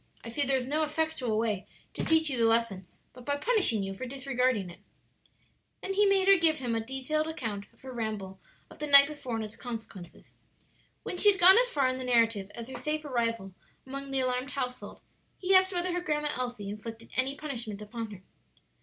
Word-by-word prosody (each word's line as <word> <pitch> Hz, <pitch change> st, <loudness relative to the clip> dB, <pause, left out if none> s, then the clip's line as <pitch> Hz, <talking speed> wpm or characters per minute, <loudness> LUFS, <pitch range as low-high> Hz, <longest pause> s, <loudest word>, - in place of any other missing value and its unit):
I 230 Hz, -, -7 dB
see 260 Hz, +6 st, -2 dB
there 270 Hz, 0 st, +2 dB
is 250 Hz, -, -3 dB
no 300 Hz, +4 st, -1 dB
effectual 305 Hz, -7 st, -1 dB
way 215 Hz, -3 st, -1 dB, 0.3 s
to -, -, -4 dB
teach 320 Hz, 0 st, +3 dB
you 275 Hz, -, 0 dB
the 230 Hz, -2 st, +2 dB
lesson 225 Hz, -5 st, +1 dB, 0.3 s
but 250 Hz, -, -13 dB
by 285 Hz, +3 st, -1 dB
punishing 325 Hz, -, +2 dB
you 195 Hz, 0 st, -4 dB
for 255 Hz, +7 st, -6 dB
disregarding 255 Hz, -7 st, -1 dB
it." -, -, -15 dB, 1.0 s
Then 390 Hz, -, -2 dB
he 410 Hz, +1 st, +4 dB
made 390 Hz, -1 st, +3 dB
her 395 Hz, 0 st, +8 dB
give 325 Hz, -2 st, +3 dB
him 245 Hz, -4 st, -2 dB
a 225 Hz, -1 st, -1 dB
detailed 270 Hz, +5 st, -2 dB
account 225 Hz, -11 st, -5 dB
of 230 Hz, -, -28 dB
her 265 Hz, -, -9 dB
ramble 215 Hz, -5 st, -4 dB, 0.3 s
of -, -, -14 dB
the 300 Hz, -, -3 dB
night 280 Hz, -1 st, +9 dB
before 285 Hz, -6 st, -6 dB
and 220 Hz, -1 st, -3 dB
its 210 Hz, -, -10 dB
consequences. 220 Hz, -7 st, -9 dB, 0.7 s
When 360 Hz, -, -5 dB
she 415 Hz, -, +7 dB
had 390 Hz, -, -5 dB
gone 375 Hz, +5 st, +9 dB
as -, -, +2 dB
far 280 Hz, -, +1 dB
in 255 Hz, 0 st, -2 dB
the -, -, -4 dB
narrative 230 Hz, -5 st, +2 dB
as 235 Hz, -1 st, -7 dB
her 265 Hz, -, -7 dB
safe 305 Hz, 0 st, -2 dB
arrival 230 Hz, -7 st, -2 dB, 0.3 s
among 275 Hz, +1 st, -6 dB
the 270 Hz, -1 st, +1 dB
alarmed 255 Hz, +1 st, -1 dB
household, 255 Hz, -3 st, -5 dB, 0.4 s
he 380 Hz, +1 st, 0 dB
asked 375 Hz, 0 st, +5 dB
whether 355 Hz, 0 st, -1 dB
her 355 Hz, -, -1 dB
Grandma 300 Hz, -3 st, -1 dB
Elsie 245 Hz, -5 st, -4 dB
inflicted 225 Hz, +2 st, -9 dB
any 265 Hz, +2 st, +1 dB
punishment 240 Hz, -9 st, -5 dB
upon 225 Hz, +1 st, -6 dB
her. 195 Hz, -3 st, -11 dB
255 Hz, 210 wpm, -29 LUFS, 225-305 Hz, 1.0 s, night